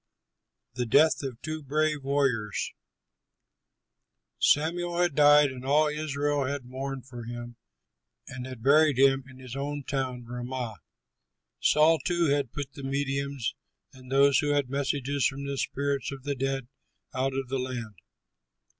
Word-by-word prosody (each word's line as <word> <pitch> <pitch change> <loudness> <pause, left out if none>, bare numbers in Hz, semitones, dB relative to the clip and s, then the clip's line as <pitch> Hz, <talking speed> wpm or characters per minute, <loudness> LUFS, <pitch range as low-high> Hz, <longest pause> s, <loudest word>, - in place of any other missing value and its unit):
THE 125 0 -2
DEATH 150 +7 +4
OF 130 -4 -5
TWO 155 0 -4
BRAVE 150 +1 0
WARRIORS 135 -7 0 1.7
Samuel 170 +3 +2
had 175 -3 +2
died 145 -1 +6
and 130 -1 -9
all 150 +3 +3
Israel 145 -2 -1
had 140 -1 -3
mourned 130 +1 -5
for 120 -3 -9
him 120 0 -7 0.7
and 125 0 -7
had 130 -4 -9
buried 150 0 +5
him 135 0 +4
in 130 - -14
his 130 -1 -9
own 145 +1 -3
town 130 -3 -3
Ramah. 120 -2 -5 0.8
Saul, 155 +1 +4
too, 175 -1 +1
had 140 -4 0
put 145 -2 -6
the 145 - -9
mediums 140 -1 -2 0.4
and 130 -1 -14
those 140 0 +5
who 145 0 +1
had 140 -3 0
messages 140 0 0
from 140 +1 -5
the 140 0 -3
spirits 140 0 -1
of 135 -1 -8
the 145 0 -1
dead 135 -1 -2 0.5
out 130 +1 -1
of 135 -2 -3
the 135 0 -1
land. 125 -4 -4
135 Hz, 145 wpm, -28 LUFS, 130-145 Hz, 1.7 s, died